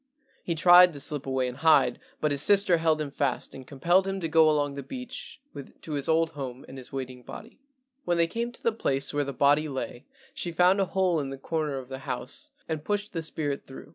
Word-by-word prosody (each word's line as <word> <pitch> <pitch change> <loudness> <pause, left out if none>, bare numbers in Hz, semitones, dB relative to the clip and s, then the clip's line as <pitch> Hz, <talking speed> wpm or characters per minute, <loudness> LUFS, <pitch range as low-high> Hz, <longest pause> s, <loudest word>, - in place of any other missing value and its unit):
He 170 - -2
tried 175 +2 +7
to 145 - -7
slip 145 -1 -3
away 130 -1 0
and 125 +1 -6
hide, 160 +3 +4 0.2
but 150 - +1
his 140 -1 0
sister 200 -1 +5
held 160 -1 +2
him 150 -2 -3
fast 140 -2 -2
and 130 -1 -10
compelled 175 +7 +2
him 195 0 -2
to 165 - -1
go 160 0 +5
along 145 -2 +1
the 140 - -6
beach 250 - -8 0.4
to 160 - -8
his 140 0 -2
old 165 0 +2
home 135 -4 -7
and 130 - -9
his 125 - -11
waiting 130 -2 -6
body. 125 - -11 0.4
When 175 -1 0
they 170 - +4
came 235 +7 -3
to 245 - -15
the 230 - +3
place 140 -11 -2
where 145 0 +1
the 140 - -4
body 145 +3 +3
lay 130 -1 -6 0.3
she 175 - -4
found 180 +3 +4
a - - +2
hole 185 -3 +1
in 140 -2 -3
the 135 - -6
corner 150 0 -2
of 130 -1 -7
the 130 0 -7
house 135 - -4 0.2
and 160 -2 -3
pushed 205 +2 -2
the 165 - -2
spirit 150 -3 -3
through. 135 +1 -11
155 Hz, 230 wpm, -27 LUFS, 135-175 Hz, 0.4 s, tried